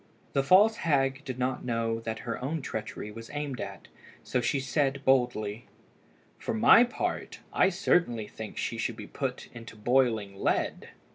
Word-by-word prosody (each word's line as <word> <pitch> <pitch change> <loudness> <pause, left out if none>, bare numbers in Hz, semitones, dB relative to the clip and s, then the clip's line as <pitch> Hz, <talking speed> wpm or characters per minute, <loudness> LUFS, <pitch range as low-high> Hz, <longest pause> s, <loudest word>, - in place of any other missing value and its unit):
The 135 - +3
false 200 +10 +5
hag 135 -3 +1
did 130 -3 -5
not 130 0 -1
know 115 -1 -1
that 110 -1 -5
her 115 +1 -4
own 150 +2 -2
treachery 110 -2 -5
was 115 +1 -10
aimed 145 -3 -3
at, - - -7 0.4
so 125 - 0
she 135 +3 +1
said 135 0 0
boldly 120 -4 +1 0.7
"For - - -3
my 170 - +7
part, 245 - -3
I 190 - +4
certainly 170 - +1
think 110 0 -8
she - - -2
should - - -1
be - - -7
put - - -4
into 115 -1 -10
boiling 110 -4 +1
lead." - - 0
125 Hz, 160 wpm, -29 LUFS, 115-140 Hz, 0.7 s, my